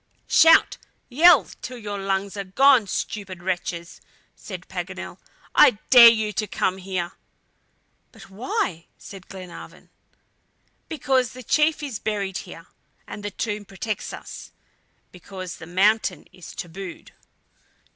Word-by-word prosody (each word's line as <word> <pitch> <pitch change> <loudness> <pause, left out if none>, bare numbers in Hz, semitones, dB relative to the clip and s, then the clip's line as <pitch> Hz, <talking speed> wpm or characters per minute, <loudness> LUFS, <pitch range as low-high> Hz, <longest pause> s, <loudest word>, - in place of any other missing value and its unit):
"Shout! 325 0 +5 0.3
yell! 320 +5 +6 0.2
till 250 - -7
your 205 -3 -6
lungs 195 +1 -2
are 200 - -4
gone, 245 +3 +4
stupid 185 -2 -5
wretches!" 175 -2 -4 0.3
said - - -9
Paganel. - - -7 0.3
"I 245 - +6
dare 240 -2 +11
you 220 -2 0
to 215 - -2
come 190 0 -1
here!" 185 -2 -4 1.0
"But - - -15
why?" 200 - -3
said 195 -2 -12
Glenarvan. 185 -3 -11 1.0
"Because 260 -5 0
the 255 0 -10
chief 305 +2 +1
is 265 -7 -5
buried 200 -3 -3
here, 165 -1 -11 0.4
and 205 - -8
the 205 - -3
tomb 210 +1 -4
protects 205 +2 -5
us, - - -10 0.6
because 185 0 -9
the 160 - -11
mountain 205 +5 +1
is 180 -3 -12
tabooed." 175 0 -8
200 Hz, 125 wpm, -23 LUFS, 185-240 Hz, 1.0 s, dare